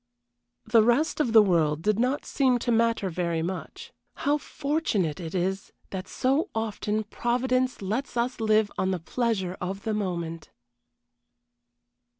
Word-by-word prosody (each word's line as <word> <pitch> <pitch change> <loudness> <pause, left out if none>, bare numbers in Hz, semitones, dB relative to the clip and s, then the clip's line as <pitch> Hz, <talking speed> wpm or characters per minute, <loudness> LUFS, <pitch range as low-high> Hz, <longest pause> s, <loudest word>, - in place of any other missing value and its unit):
The 225 0 +5
rest 240 +10 +2
of 250 -7 +1
the 220 -1 +8
world 160 -5 +1
did 215 +1 +2
not 255 +4 0
seem 260 -3 +2
to 240 - +2
matter 230 -3 +2
very 170 -1 -1
much. 185 +2 -6 0.2
How 290 +1 +1
fortunate 275 - -1
it 170 0 -6
is 190 +2 -1 0.2
that 190 0 -5
so 275 - 0
often 220 -1 -1
Providence 255 +2 0
lets 235 +7 -3
us 240 +1 -1
live 215 -1 +3
on 185 - +1
the 185 -2 -1
pleasure 190 -1 -1
of 195 +2 -4
the 220 - -1
moment! 170 -5 -3
215 Hz, 145 wpm, -27 LUFS, 185-245 Hz, 0.2 s, the